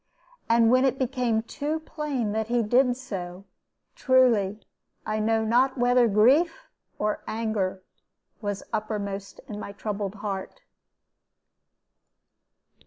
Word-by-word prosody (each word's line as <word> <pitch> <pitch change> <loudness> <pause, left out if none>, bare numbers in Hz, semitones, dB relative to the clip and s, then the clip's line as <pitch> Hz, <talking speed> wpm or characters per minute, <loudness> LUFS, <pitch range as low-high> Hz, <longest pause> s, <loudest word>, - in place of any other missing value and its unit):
And 230 0 +5
when 255 +1 +5
it 265 -1 +2
became 250 -4 0
too 295 +6 -3
plain 290 -9 -3
that 220 +1 -1
he 240 0 +1
did 245 +3 +3
so, 190 -7 -7 0.5
truly 230 -6 +3 0.5
I 215 0 -1
know 220 +1 +1
not 255 +4 +2
whether 245 0 +4
grief 275 - +3 0.3
or 210 0 -1
anger 210 -4 -2 0.6
was 205 -2 -3
uppermost 205 -2 -4
in 210 -1 -6
my 200 - -7
troubled 205 -1 -4
heart. 200 -2 -5
225 Hz, 110 wpm, -26 LUFS, 205-255 Hz, 0.6 s, And